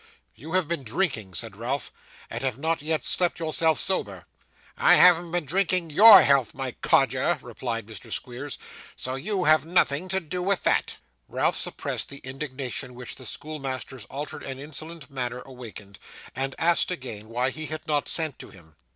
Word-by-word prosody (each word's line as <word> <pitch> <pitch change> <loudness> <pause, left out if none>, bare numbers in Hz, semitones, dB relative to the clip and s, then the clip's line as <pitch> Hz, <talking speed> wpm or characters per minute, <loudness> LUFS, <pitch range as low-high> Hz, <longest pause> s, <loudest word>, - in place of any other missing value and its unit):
'You 160 +4 -10
have 185 -4 +1
been 170 -2 -2
drinking,' 115 - -2
said 110 +1 -4
Ralph, 125 +6 -3 0.4
'and 115 - -5
have 130 -3 -2
not 160 +2 -1
yet 155 -2 -1
slept 180 -1 +2
yourself 160 0 +1
sober.' 100 - 0 0.5
'I - - +6
haven't 175 -1 +6
been 175 -2 -1
drinking 180 +1 +1
YOUR 210 +7 +9
health, 140 -5 +2
my 135 -1 -3
codger,' - - +2
replied 115 -3 -4
Mr. 110 -1 -11
Squeers; 130 +3 -4 0.4
'so 130 - -4
you 185 +8 -2
have 155 -1 +5
nothing 165 -1 +2
to 190 +1 0
do 180 +1 -4
with 195 +1 0
that.' - - +1 0.3
Ralph - - +1
suppressed - - -2
the 140 - -9
indignation 130 -2 -5
which 125 -1 -8
the 130 -3 -11
schoolmaster's 135 -6 -6
altered 145 +5 -7
and 135 -1 -6
insolent 155 +1 -8
manner 125 -2 -3
awakened, 115 -6 -11 0.4
and 135 0 -2
asked 170 +1 +2
again 115 - -6
why 125 +3 0
he 155 +3 -6
had 155 0 -7
not 150 -2 0
sent 160 -5 +4
to - - -10
him. 80 -5 -18
140 Hz, 170 wpm, -25 LUFS, 125-165 Hz, 0.5 s, YOUR